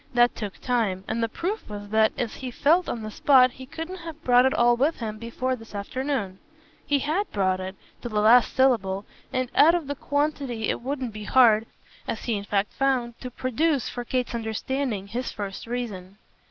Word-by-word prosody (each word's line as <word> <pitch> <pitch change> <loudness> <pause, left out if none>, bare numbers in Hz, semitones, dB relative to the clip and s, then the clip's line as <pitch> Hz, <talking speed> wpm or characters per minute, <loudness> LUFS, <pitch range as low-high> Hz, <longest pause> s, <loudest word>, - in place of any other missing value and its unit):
That 240 0 +5
took 205 -4 -5
time, 220 -7 -1
and 230 +1 -1
the 230 - 0
proof 385 - -4
was 205 -1 -7
that, 220 0 +4
as 235 -3 -2
he 260 - -5
felt 320 +8 +2
on 230 - -4
the 215 - -5
spot, 255 +1 +5
he 260 +1 -11
couldn't 325 +6 -6
have 330 -2 -9
brought 250 -1 +5
it 265 - 0
all 240 0 +4
with 285 +7 +1
him 215 -2 -5
before 255 +3 -2
this 225 -3 -13
afternoon. 205 -2 -3 0.5
He 290 -1 +3
HAD 315 +9 -1
brought 185 -2 +1
it, 185 +1 -5 0.3
to 240 - -5
the 215 -2 0
last 230 +3 +5
syllable, 210 -7 +2 0.3
and, 255 -1 -1
out 325 +4 +6
of 340 -3 -2
the 285 - -3
quantity 285 -5 -1
it - - -1
wouldn't 255 -2 -3
be 210 0 -7
hard 225 -3 +5 0.4
as 220 - -3
he 235 - -1
in 200 0 -4
fact 205 0 0
found 255 -4 0
to 250 - -6
produce, 260 +3 0
for 245 - -5
Kate's 250 0 -2
understanding, 230 -1 -2
his 235 +5 -4
first 200 +1 -6
reason. 205 -6 -5
240 Hz, 200 wpm, -25 LUFS, 215-270 Hz, 0.5 s, out